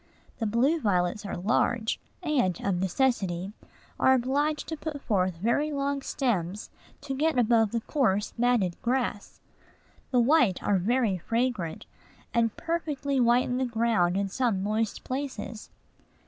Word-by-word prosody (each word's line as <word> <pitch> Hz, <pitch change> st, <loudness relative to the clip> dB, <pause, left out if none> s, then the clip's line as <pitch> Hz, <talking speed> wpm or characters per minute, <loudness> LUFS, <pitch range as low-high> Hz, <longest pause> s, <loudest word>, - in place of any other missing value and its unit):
The 225 Hz, -, 0 dB
blue 260 Hz, +10 st, +2 dB
violets 200 Hz, 0 st, 0 dB
are -, -, -4 dB
large, 220 Hz, +4 st, +1 dB, 0.2 s
and, 255 Hz, -, +1 dB
of 190 Hz, -3 st, 0 dB
necessity, 190 Hz, -2 st, 0 dB, 0.5 s
are 265 Hz, -, +5 dB
obliged 285 Hz, +5 st, 0 dB
to 320 Hz, -, -2 dB
put 305 Hz, -1 st, -5 dB
forth 185 Hz, -8 st, 0 dB
very 235 Hz, -, +1 dB
long 280 Hz, -1 st, -1 dB
stems 205 Hz, -8 st, -2 dB, 0.3 s
to 285 Hz, -1 st, -4 dB
get 305 Hz, +1 st, +1 dB
above 225 Hz, -3 st, +3 dB
the 230 Hz, -, -1 dB
coarse, 220 Hz, -7 st, 0 dB
matted 230 Hz, -7 st, +1 dB
grass. 240 Hz, -4 st, -2 dB, 0.7 s
The 250 Hz, -, +2 dB
white 240 Hz, -, +3 dB
are 200 Hz, -2 st, +2 dB
very 220 Hz, -1 st, +1 dB
fragrant, 230 Hz, -5 st, -2 dB, 0.5 s
and 230 Hz, -2 st, +1 dB
perfectly 290 Hz, -5 st, -2 dB
whiten 245 Hz, +1 st, +3 dB
the 260 Hz, -, +1 dB
ground 225 Hz, -7 st, +1 dB
in 200 Hz, 0 st, 0 dB
some 210 Hz, -2 st, 0 dB
moist 215 Hz, +1 st, -1 dB
places. 255 Hz, -5 st, -5 dB
235 Hz, 135 wpm, -27 LUFS, 200-265 Hz, 0.7 s, are